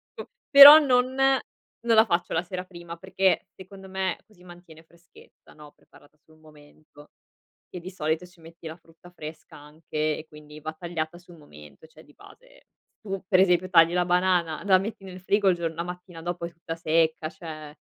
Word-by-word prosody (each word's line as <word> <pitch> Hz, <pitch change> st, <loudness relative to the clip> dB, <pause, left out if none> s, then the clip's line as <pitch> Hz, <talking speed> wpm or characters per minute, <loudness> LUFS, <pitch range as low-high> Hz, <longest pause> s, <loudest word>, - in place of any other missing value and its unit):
p -, -, -8 dB, 0.3 s
però 285 Hz, +1 st, +11 dB
non 255 Hz, -3 st, +1 dB, 0.7 s
non 230 Hz, -1 st, +2 dB
la 220 Hz, +1 st, +6 dB
faccio 175 Hz, -3 st, -2 dB
la 165 Hz, +2 st, -1 dB
sera 180 Hz, 0 st, -7 dB
prima, 175 Hz, -2 st, -11 dB
perché, 190 Hz, +2 st, -1 dB
secondo 190 Hz, 0 st, -13 dB
me, 190 Hz, -1 st, -3 dB
così 185 Hz, -5 st, -23 dB
mantiene 175 Hz, -2 st, -16 dB
freschezza, 170 Hz, +1 st, -22 dB
no, 150 Hz, -1 st, -16 dB
preparata 145 Hz, +1 st, -23 dB
sul 155 Hz, 0 st, -24 dB
momento. 150 Hz, -1 st, -20 dB, 0.6 s
Che 180 Hz, -, -8 dB
di 180 Hz, +2 st, -9 dB
solito 160 Hz, -1 st, -3 dB
ci 180 Hz, -1 st, -24 dB
metti 165 Hz, 0 st, -13 dB
la 160 Hz, -, -8 dB
frutta 165 Hz, +1 st, -20 dB
fresca, 155 Hz, -2 st, -11 dB
anche, 155 Hz, +1 st, -5 dB
e 155 Hz, -, -10 dB
quindi 150 Hz, 0 st, -14 dB
va 155 Hz, +1 st, -7 dB
tagliata 165 Hz, 0 st, -6 dB
sul 175 Hz, -1 st, -18 dB
momento, 75 Hz, -, -16 dB
cioè -, -, -19 dB
di -, -, -22 dB
base -, -, -20 dB, 0.4 s
tu, 195 Hz, -2 st, -5 dB
per 185 Hz, -, +3 dB
esempio, 185 Hz, -1 st, +2 dB
tagli 165 Hz, -2 st, +5 dB
la 180 Hz, 0 st, +1 dB
banana, 180 Hz, -3 st, 0 dB
la 190 Hz, -2 st, +4 dB
metti 200 Hz, +1 st, -6 dB
nel 185 Hz, -1 st, -10 dB
frigo 200 Hz, +1 st, +1 dB
il 180 Hz, -, +2 dB
gior 165 Hz, -1 st, -3 dB
la 170 Hz, +1 st, -5 dB
mattina 180 Hz, -1 st, -10 dB
dopo 175 Hz, 0 st, -5 dB
è 170 Hz, -, -8 dB
tutta 165 Hz, -1 st, -8 dB
secca, 160 Hz, -1 st, 0 dB
cioè 155 Hz, -2 st, -11 dB
170 Hz, 190 wpm, -25 LUFS, 155-185 Hz, 0.7 s, però